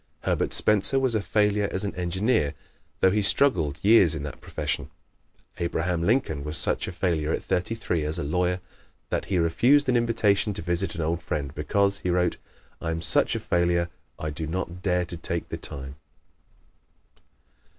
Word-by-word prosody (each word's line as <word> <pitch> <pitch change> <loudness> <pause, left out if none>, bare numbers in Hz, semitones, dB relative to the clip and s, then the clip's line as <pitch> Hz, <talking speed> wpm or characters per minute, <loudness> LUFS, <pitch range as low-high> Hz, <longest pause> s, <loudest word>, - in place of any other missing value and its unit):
Herbert - - 0
Spencer 105 +5 +4
was 130 -3 +2
a 110 - +1
failure 105 0 +1
as 95 - -1
an 100 - -3
engineer, 90 - 0 0.5
though 95 - +5
he 105 +2 +1
struggled 95 - +4
years 100 -6 +6
in 75 - -5
that 75 -2 -7
profession. - - -3 0.7
Abraham 85 0 -1
Lincoln 85 - +1
was 75 +2 -3
such - - -1
a - - -4
failure 85 -4 -1
at - - -2
thirty 90 +5 -1
three 95 -7 -2
as 75 +3 -2
a 85 - -2
lawyer 90 +4 0 0.5
that - - -1
he 95 - -1
refused 120 - +3
an 125 - +3
invitation 110 -4 +1
to - - -5
visit 85 +2 -2
an 85 - -3
old 85 +2 -1
friend 70 -2 -3
"because," 100 +6 0
he 90 - -3
wrote, 90 0 +1 0.4
"I 80 - -3
am 80 0 -3
such - - +2
a - - -1
failure 85 0 +1 0.3
I 75 - -4
do 80 +1 -5
not 90 +1 -4
dare 90 -2 +1
to 85 0 -7
take 85 0 -4
the - - -4
time." 70 0 -8
90 Hz, 180 wpm, -26 LUFS, 80-100 Hz, 0.7 s, years